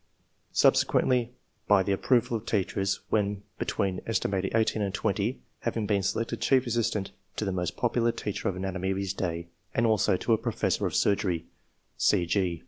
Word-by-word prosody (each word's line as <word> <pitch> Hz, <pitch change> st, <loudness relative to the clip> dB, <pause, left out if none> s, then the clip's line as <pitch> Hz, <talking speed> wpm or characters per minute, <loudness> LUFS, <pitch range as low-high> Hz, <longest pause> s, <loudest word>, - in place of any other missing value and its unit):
Subsequently, 125 Hz, -2 st, +3 dB, 0.4 s
by 100 Hz, -2 st, +5 dB
the 100 Hz, -, -1 dB
approval 120 Hz, +4 st, +2 dB
of 110 Hz, 0 st, -5 dB
teachers, 100 Hz, -1 st, 0 dB
when 105 Hz, -1 st, 0 dB, 0.2 s
between 95 Hz, -3 st, -1 dB
aet. 115 Hz, -, 0 dB, 0.3 s
18 110 Hz, -1 st, +2 dB
and 100 Hz, -2 st, -1 dB
20, 100 Hz, +6 st, -1 dB, 0.2 s
having 115 Hz, -2 st, -2 dB
been 100 Hz, -1 st, +1 dB
selected 115 Hz, +4 st, -2 dB
chief 130 Hz, -1 st, +3 dB
assistant 115 Hz, -4 st, -1 dB, 0.2 s
to 110 Hz, -, -2 dB
the 95 Hz, -, 0 dB
most 90 Hz, -2 st, -2 dB
popular 120 Hz, -1 st, +2 dB
teacher 105 Hz, -4 st, -3 dB
of 95 Hz, -, -3 dB
anatomy 95 Hz, 0 st, -3 dB
of 95 Hz, -, 0 dB
his 100 Hz, -1 st, -2 dB
day, 85 Hz, -3 st, -3 dB, 0.3 s
and 115 Hz, -, +3 dB
also 105 Hz, -4 st, +3 dB
to 115 Hz, -, +1 dB
a 110 Hz, -, +2 dB
professor -, -, 0 dB
of -, -, -4 dB
surgery." 95 Hz, -5 st, +1 dB
105 Hz, 160 wpm, -28 LUFS, 95-115 Hz, 0.4 s, by